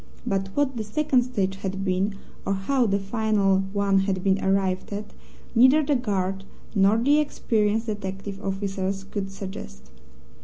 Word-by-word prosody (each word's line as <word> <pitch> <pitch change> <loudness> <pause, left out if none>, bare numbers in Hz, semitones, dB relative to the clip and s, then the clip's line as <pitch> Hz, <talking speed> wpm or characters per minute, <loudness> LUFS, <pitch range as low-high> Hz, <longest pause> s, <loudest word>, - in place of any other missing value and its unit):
But 195 0 0
what 275 -3 +1
the 220 - -2
second 260 +4 +2
stage 195 -6 -1
had 195 0 -4
been, 190 +2 0 0.3
or 195 - 0
how 245 +6 +1
the 200 -1 +2
final 200 -1 +1
one 200 -1 +2
had 190 -1 -1
been 195 0 +2
arrived 190 -1 +1
at, 205 +1 -5 0.4
neither 260 +6 +6
the 290 0 +1
guard 195 -5 -1 0.3
nor 200 +1 +4
the 285 +6 +4
experienced 225 -6 0
detective 200 -1 -5
officers 195 0 -2
could 195 0 -4
suggest. 65 - -8
200 Hz, 150 wpm, -25 LUFS, 195-225 Hz, 0.4 s, neither